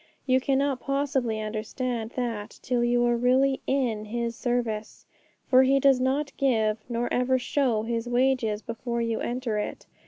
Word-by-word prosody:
You 260 Hz, -1 st, +3 dB
cannot 275 Hz, 0 st, +1 dB
possibly 270 Hz, -5 st, -1 dB
understand 225 Hz, +2 st, -3 dB
that 230 Hz, -4 st, -4 dB
till 245 Hz, -1 st, 0 dB
you 240 Hz, 0 st, +2 dB
are 240 Hz, 0 st, +3 dB
really 260 Hz, +3 st, +2 dB
in 240 Hz, -6 st, 0 dB
His 235 Hz, +1 st, -3 dB
service! 235 Hz, -4 st, -3 dB, 0.4 s
For 255 Hz, 0 st, +6 dB
He 270 Hz, +1 st, +4 dB
does 270 Hz, -1 st, +4 dB
not 275 Hz, +3 st, 0 dB
give, 220 Hz, -5 st, +1 dB
nor 240 Hz, 0 st, -1 dB
even 250 Hz, +1 st, +2 dB
show, 250 Hz, -4 st, 0 dB
His 230 Hz, +1 st, -2 dB
wages 245 Hz, -4 st, +1 dB
before 235 Hz, 0 st, -3 dB
you 230 Hz, -1 st, -1 dB
enter 240 Hz, -3 st, -2 dB
it. 210 Hz, -, -5 dB
245 Hz, 155 wpm, -26 LUFS, 225-260 Hz, 0.4 s, For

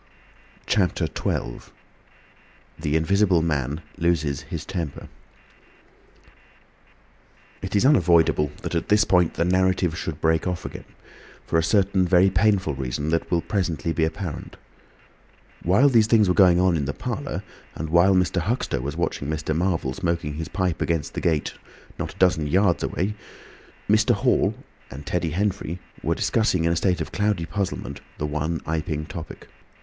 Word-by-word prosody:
CHAPTER 100 Hz, -4 st, +1 dB
XII. -, -, -4 dB, 1.1 s
THE 75 Hz, -1 st, -1 dB
INVISIBLE 90 Hz, +1 st, +3 dB
MAN 75 Hz, -1 st, -1 dB, 0.2 s
LOSES 80 Hz, -5 st, 0 dB
HIS -, -, -5 dB
TEMPER 85 Hz, -7 st, -5 dB, 2.5 s
It 95 Hz, +1 st, -4 dB
is 100 Hz, -, +3 dB
unavoidable 85 Hz, -, +4 dB
that -, -, -4 dB
at -, -, -2 dB
this 105 Hz, 0 st, +5 dB
point 90 Hz, -5 st, +2 dB
the 85 Hz, -, +1 dB
narrative 90 Hz, -2 st, +2 dB
should 80 Hz, -2 st, -5 dB
break 80 Hz, +2 st, +1 dB
off 90 Hz, -1 st, -3 dB
again, -, -, -7 dB, 0.6 s
for 80 Hz, -, +1 dB
a -, -, +1 dB
certain 95 Hz, 0 st, +2 dB
very 95 Hz, +2 st, +4 dB
painful 95 Hz, -4 st, +2 dB
reason 65 Hz, +3 st, -3 dB
that 80 Hz, 0 st, 0 dB
will 85 Hz, -2 st, +1 dB
presently 85 Hz, -7 st, -1 dB
be 80 Hz, -, 0 dB
apparent. 80 Hz, 0 st, -4 dB, 1.0 s
While 100 Hz, +11 st, +4 dB
these 115 Hz, -5 st, +4 dB
things 110 Hz, -3 st, +4 dB
were 90 Hz, -, +3 dB
going 90 Hz, -2 st, +5 dB
on 90 Hz, -1 st, +3 dB
in 75 Hz, -4 st, -1 dB
the 75 Hz, -, -2 dB
parlour, -, -, -4 dB, 0.3 s
and 80 Hz, 0 st, -5 dB
while 90 Hz, +3 st, +5 dB
Mr. 90 Hz, -1 st, +1 dB
Huxter 110 Hz, -, -1 dB
was 70 Hz, +3 st, -5 dB
watching 70 Hz, -, -2 dB
Mr. 80 Hz, 0 st, -2 dB
Marvel 85 Hz, -6 st, 0 dB
smoking 85 Hz, -3 st, -2 dB
his 80 Hz, +2 st, -5 dB
pipe 90 Hz, -4 st, -2 dB
against 80 Hz, -3 st, -1 dB
the -, -, -4 dB
gate, 80 Hz, -3 st, 0 dB, 0.5 s
not -, -, -4 dB
a -, -, -20 dB
dozen 85 Hz, -5 st, +2 dB
yards 90 Hz, +2 st, +2 dB
away 100 Hz, +4 st, -1 dB, 0.7 s
were -, -, +5 dB
Mr. -, -, +3 dB
Hall -, -, +2 dB, 0.3 s
and 70 Hz, +2 st, -9 dB
Teddy 90 Hz, -2 st, -1 dB
Henfrey 95 Hz, 0 st, -2 dB, 0.4 s
discussing 95 Hz, -7 st, +1 dB
in 85 Hz, -, +2 dB
a -, -, +1 dB
state 90 Hz, +1 st, +1 dB
of -, -, -5 dB
cloudy 105 Hz, -4 st, 0 dB
puzzlement 95 Hz, -7 st, -4 dB, 0.2 s
the 75 Hz, -, -2 dB
one 75 Hz, +3 st, -2 dB
Iping 80 Hz, -1 st, -2 dB
topic. 85 Hz, -3 st, -9 dB
85 Hz, 155 wpm, -24 LUFS, 80-95 Hz, 2.5 s, this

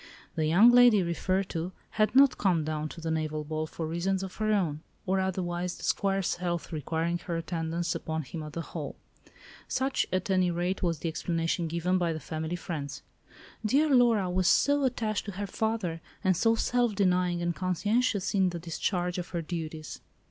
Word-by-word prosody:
The 155 Hz, -1 st, 0 dB
young 200 Hz, +10 st, +7 dB
lady 240 Hz, -5 st, +7 dB
referred 185 Hz, +3 st, 0 dB
to 170 Hz, +3 st, -3 dB, 0.2 s
had 215 Hz, +2 st, +1 dB
not 275 Hz, 0 st, +6 dB
come 180 Hz, -5 st, +2 dB
down 155 Hz, 0 st, -3 dB
to -, -, -9 dB
the 165 Hz, 0 st, -3 dB
naval 155 Hz, -1 st, -1 dB
ball 155 Hz, +1 st, -3 dB
for 165 Hz, +1 st, -5 dB
reasons 180 Hz, +4 st, -1 dB
of 190 Hz, -, -7 dB
her 215 Hz, 0 st, +1 dB
own, 165 Hz, -8 st, 0 dB, 0.2 s
or 190 Hz, +1 st, +1 dB
otherwise, 180 Hz, -1 st, -2 dB
the -, -, -12 dB
Squire's 195 Hz, -3 st, 0 dB
health 175 Hz, -1 st, -3 dB
requiring 165 Hz, +2 st, -1 dB
her 170 Hz, -1 st, -3 dB
attendance 165 Hz, 0 st, -2 dB
upon 160 Hz, 0 st, -3 dB
him 150 Hz, +5 st, -7 dB
at 150 Hz, -1 st, -8 dB
the 170 Hz, -, -3 dB
Hall. -, -, -6 dB, 0.7 s
Such, 265 Hz, +1 st, 0 dB
at 185 Hz, +1 st, -1 dB
any 185 Hz, -1 st, +3 dB
rate, 175 Hz, +2 st, -1 dB
was 170 Hz, -3 st, 0 dB
the 165 Hz, -, -4 dB
explanation 165 Hz, +1 st, -1 dB
given 170 Hz, +3 st, 0 dB
by 170 Hz, -2 st, +1 dB
the 160 Hz, -, -4 dB
family 160 Hz, +2 st, -4 dB
friends:—"Dear 180 Hz, -, -3 dB
Laura 235 Hz, -6 st, +4 dB
was 180 Hz, 0 st, +1 dB
so 285 Hz, +6 st, +4 dB
attached 225 Hz, -4 st, -1 dB
to 205 Hz, -, -5 dB
her 200 Hz, +2 st, -3 dB
father, 200 Hz, -6 st, -2 dB, 0.2 s
and 185 Hz, -2 st, +3 dB
so 225 Hz, +6 st, +3 dB
self 240 Hz, -2 st, +1 dB
denying 180 Hz, -3 st, +2 dB
and 170 Hz, -1 st, -1 dB
conscientious 200 Hz, +3 st, 0 dB
in 190 Hz, -2 st, +3 dB
the 175 Hz, -, -5 dB
discharge 175 Hz, +2 st, -2 dB
of 175 Hz, -, -5 dB
her 170 Hz, -2 st, -3 dB
duties." 160 Hz, -2 st, -6 dB
180 Hz, 185 wpm, -29 LUFS, 165-195 Hz, 0.7 s, young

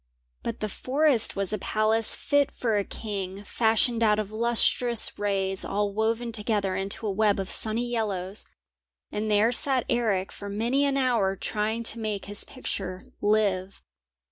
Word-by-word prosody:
But -, -, -5 dB
the 215 Hz, -, 0 dB
forest 265 Hz, +3 st, +2 dB
was 195 Hz, 0 st, -1 dB
a 215 Hz, -, -1 dB
palace 215 Hz, +1 st, +1 dB
fit 285 Hz, -1 st, +2 dB
for 225 Hz, -3 st, -1 dB
a 205 Hz, -, +2 dB
king, 195 Hz, -2 st, -5 dB
fashioned 225 Hz, +2 st, +2 dB
out 210 Hz, -2 st, +4 dB
of 215 Hz, -1 st, -3 dB
lustrous 235 Hz, +1 st, +2 dB
rays 195 Hz, -2 st, 0 dB
all 205 Hz, 0 st, -1 dB
woven 225 Hz, +2 st, 0 dB
together 210 Hz, -3 st, -1 dB
into 195 Hz, +3 st, -3 dB
a 205 Hz, -, 0 dB
web 205 Hz, 0 st, +2 dB
of 190 Hz, -1 st, -3 dB
sunny 225 Hz, +2 st, +2 dB
yellows, 205 Hz, -5 st, -1 dB, 0.7 s
and 215 Hz, +1 st, -2 dB
there 210 Hz, +2 st, +4 dB
sat 260 Hz, 0 st, +3 dB
Eric 215 Hz, -6 st, +1 dB
for 200 Hz, -, -8 dB
many 235 Hz, +7 st, +1 dB
an 275 Hz, -1 st, +1 dB
hour 235 Hz, -8 st, +2 dB
trying 215 Hz, +4 st, -2 dB
to 230 Hz, 0 st, -1 dB
make 215 Hz, -3 st, -3 dB
his 205 Hz, 0 st, -4 dB
picture 185 Hz, -8 st, -5 dB, 0.2 s
live. 200 Hz, -3 st, +1 dB
215 Hz, 160 wpm, -26 LUFS, 200-235 Hz, 0.7 s, out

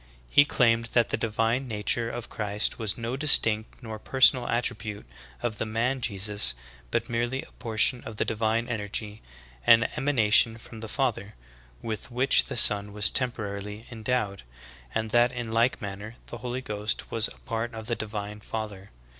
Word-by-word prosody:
He 145 Hz, -, +7 dB
claimed 115 Hz, -5 st, +2 dB
that 120 Hz, -2 st, +4 dB
the -, -, +1 dB
divine 115 Hz, +3 st, 0 dB
nature 115 Hz, +1 st, -1 dB
of 120 Hz, -1 st, -6 dB
Christ 105 Hz, -1 st, -2 dB
was 110 Hz, -2 st, -1 dB
no 115 Hz, +1 st, -3 dB
distinct 115 Hz, -6 st, +2 dB
nor 110 Hz, -2 st, -6 dB
personal 130 Hz, 0 st, +4 dB
attribute 115 Hz, -3 st, -2 dB, 0.4 s
of 110 Hz, -3 st, -2 dB
the -, -, 0 dB
man 120 Hz, +4 st, -1 dB
Jesus, 100 Hz, -, +1 dB, 0.3 s
but -, -, -1 dB
mere 120 Hz, 0 st, 0 dB
ly 130 Hz, +2 st, -4 dB
a -, -, -21 dB
portion 115 Hz, +2 st, +1 dB
of 110 Hz, -2 st, -8 dB
the -, -, +1 dB
divine 115 Hz, +1 st, 0 dB
energy, 105 Hz, -1 st, -4 dB, 0.5 s
an 115 Hz, 0 st, +7 dB
emanation 115 Hz, -4 st, +3 dB
from 115 Hz, 0 st, -11 dB
the 110 Hz, -, -6 dB
Father, 110 Hz, -6 st, -2 dB, 0.5 s
with 110 Hz, 0 st, -5 dB
which 125 Hz, +3 st, +4 dB
the -, -, -5 dB
Son 105 Hz, -2 st, +5 dB
was 105 Hz, -2 st, +4 dB
temporarily 105 Hz, -4 st, -2 dB
endowed; 110 Hz, -3 st, -2 dB, 0.5 s
and 110 Hz, -1 st, -1 dB
that 120 Hz, +1 st, +4 dB
in 120 Hz, -2 st, -5 dB
like 115 Hz, +3 st, +2 dB
manner 100 Hz, +3 st, -6 dB
the 120 Hz, -, -8 dB
Holy 125 Hz, +3 st, -4 dB
Ghost 105 Hz, -3 st, -4 dB
was 115 Hz, -1 st, +2 dB
a -, -, -13 dB
part 115 Hz, +1 st, -3 dB
of 110 Hz, -1 st, -7 dB
the 120 Hz, -, -1 dB
divine 105 Hz, -1 st, -5 dB
Father. 105 Hz, -2 st, -6 dB
115 Hz, 170 wpm, -27 LUFS, 105-120 Hz, 0.5 s, He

